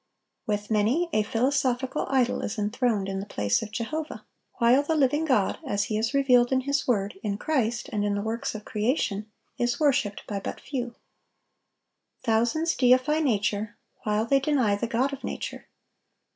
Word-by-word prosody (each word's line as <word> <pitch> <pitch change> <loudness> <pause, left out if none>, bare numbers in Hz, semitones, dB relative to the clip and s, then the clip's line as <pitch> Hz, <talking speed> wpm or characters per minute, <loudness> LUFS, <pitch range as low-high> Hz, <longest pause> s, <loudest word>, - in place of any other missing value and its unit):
With 205 0 -2
many, 235 +12 +2
a 215 - +3
philosophical 255 +3 0
idol 260 -2 +2
is - - -4
enthroned 210 -1 0
in 195 0 -3
the 200 - -6
place 100 - 0
of 220 - -5
Jehovah; 305 +8 -4 0.3
while 240 +4 +4
the 315 +2 -1
living 295 +2 +2
God, 235 -10 +1
as 205 -8 0
He 215 - -2
is 225 +1 0
revealed 250 -3 +4
in 260 0 +3
His 280 +1 -1
word, 200 -5 0
in 200 -2 -2
Christ, 240 -3 -1
and 205 -1 0
in 205 -1 0
the 205 - -2
works 225 +1 -3
of 210 - -7
creation, 215 -2 -1 0.3
is 240 +4 0
worshiped 250 -9 +1
by 200 -2 -3
but - - -6
few. 245 -4 -4 1.3
Thousands 240 +8 +1
deify 255 +4 +3
nature, 215 -5 0 0.2
while 210 +1 0
they 275 +3 +3
deny 265 -7 +2
the 215 +3 -2
God 255 +5 0
of 275 - -7
nature. - - -5
235 Hz, 170 wpm, -26 LUFS, 210-270 Hz, 1.3 s, while